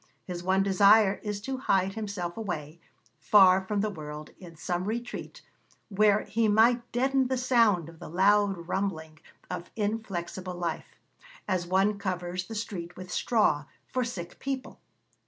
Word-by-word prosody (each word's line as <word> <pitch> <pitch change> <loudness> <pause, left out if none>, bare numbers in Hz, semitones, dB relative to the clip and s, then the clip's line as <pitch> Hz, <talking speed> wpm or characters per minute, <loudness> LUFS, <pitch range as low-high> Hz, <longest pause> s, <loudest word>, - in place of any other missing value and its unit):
His 175 -2 -5
one 190 +2 +2
desire 200 +1 +5
is 210 -2 -4
to 265 +4 -4
'hide 195 -6 +1
himself 200 -5 -4
away, 170 -7 -5 0.4
far 190 -2 +6
from 200 +1 -2
the 215 - 0
world, 150 -3 -8
in 175 -3 -12
some 175 +3 -3
retreat, 235 +3 -5 0.5
where 210 0 +3
he 220 +2 0
might 235 +3 +3
deaden 265 +1 +2
the 260 0 -1
sound 230 - +3
of 165 -1 -13
the - - -9
loud 195 0 +2
rumbling 160 -5 -3 0.3
of 175 - -5
inflexible 190 -4 -3
life, 170 -2 -4 0.5
as 185 -3 -1
one 195 +3 +2
covers 180 -2 -3
the 225 - -7
street 180 -5 -5
with 185 -1 -9
straw, 195 -10 +2 0.2
for 255 - -1
sick 185 -8 -6
people.' 270 -1 -5
195 Hz, 150 wpm, -28 LUFS, 175-220 Hz, 0.5 s, far